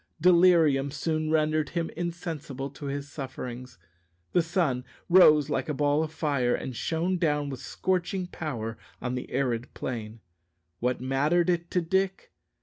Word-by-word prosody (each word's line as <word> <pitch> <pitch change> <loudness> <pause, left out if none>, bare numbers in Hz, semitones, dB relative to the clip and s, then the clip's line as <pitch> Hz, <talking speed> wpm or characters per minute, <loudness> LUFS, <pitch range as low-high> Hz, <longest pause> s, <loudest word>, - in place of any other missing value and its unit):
Delirium 170 -5 +5
soon 155 +2 -1
rendered 155 -1 +2
him 170 -2 -2
insensible 160 -6 -4
to 145 +1 -8
his 140 0 -4
sufferings. 130 -3 -7 0.5
The 175 - +4
sun 165 -7 0 0.3
rose 155 -5 +7
like 155 - -2
a 150 - -1
ball 145 +1 +2
of 160 -1 -2
fire, 140 -6 +1
and 130 - -5
shone 170 +7 -1
down 150 -4 +1
with 130 - -6
scorching 185 +6 -1
power 120 -11 -5 0.2
on 125 0 -3
the 125 - -4
arid 125 -3 -1
plain. 115 -3 -5 0.6
What 125 +1 0
mattered 150 +7 +2
it 170 0 -2
to 180 - +1
Dick? 190 +3 -1
150 Hz, 145 wpm, -28 LUFS, 135-170 Hz, 0.6 s, rose